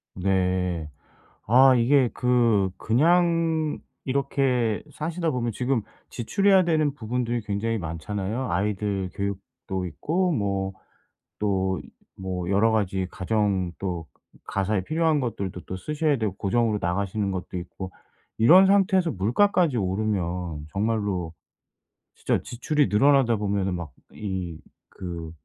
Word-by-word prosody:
네. 90 -3 0 0.6
아 130 +3 +7
이게 125 +1 +4
그 115 -6 +2
그냥 165 +3 +2 0.3
이렇게 130 -4 0
사시다 165 +2 -2
보면 120 -3 -1
지금 125 +1 0 0.3
지출해야 195 - +3
되는 155 -4 +1
부분들이 120 0 -2
굉장히 110 +2 -2
많잖아요. 100 +8 -3
아이들 100 0 -1
교육도 100 -1 -4
있고 175 - -1
뭐 100 -6 -1 0.7
또 95 -3 0 0.4
뭐 90 -1 -3
여러 110 +3 +3
가지 95 -3 0
가정 95 -2 0
또 90 -4 -4 0.3
그 - - -22
가사에 100 0 -1
필요한 160 0 +1
것들도 100 -7 -4
또 95 - -5
쓰셔야 150 - 0
되고 105 -4 -1
고정으로 110 +2 +1
나가시는 100 +3 -1
것도 95 -1 -5
있고 95 +1 -7 0.4
이런 175 +12 +7
상태에서 190 -3 +3
물가까지 135 - +2
오르면 90 -5 -2
정말로 100 -5 -1 0.8
진짜 - - 0
지출이 145 +2 0
늘어나다 120 +2 +4
보면은 100 -2 -1
막 85 -5 -6 0.2
이 95 -5 -4 0.3
그 85 -3 -7
105 Hz, 260 characters per minute, -25 LUFS, 95-130 Hz, 0.8 s, 아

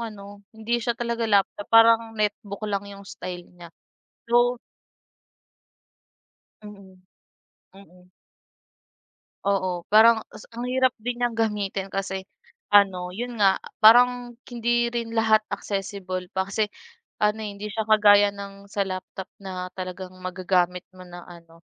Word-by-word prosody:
ano 205 -3 -8 0.2
hindi 235 +2 -1
siya 235 0 -2
talaga 235 -2 -2
laptop 200 0 +1
parang 225 0 +5
netbook 210 0 -3
lang 200 0 -3
yung 200 0 -11
style 180 -2 -8
niya, 175 -1 -13 0.6
so 240 +1 +3 2.0
Mm, 200 -3 -13 0.8
mm. 180 -2 -19 1.4
Oo 185 -3 -1
parang 225 +2 +6
ta's 210 - -13
ang 240 +2 -6
hirap 260 0 +2
din 245 +3 -3
niyang 240 -2 0
gamitin 205 -3 -1
kasi 190 -1 -4 0.5
ano, 185 -3 +4
'yon 240 +2 -5
nga 195 -2 +5
a - - -12
parang 245 +2 +5 0.2
hindi 240 0 0
rin 235 -1 -4
lahat 220 -1 +4
accessible 195 -2 -4
pa 190 - +1
kasi 215 +1 0 0.6
ano, 210 +1 +2
eh, 210 - -4
hindi 210 +1 -7
siya 220 +1 -3
kagaya 205 -1 +6
ng 200 0 -10
sa 200 0 -2
laptop 185 0 -7
na 185 -1 -6
talagang 185 0 -6
magagamit 180 -1 -1
mo 185 -1 -14
na 175 0 -11
ano 165 -1 -16
200 Hz, 130 wpm, -24 LUFS, 185-225 Hz, 2.0 s, parang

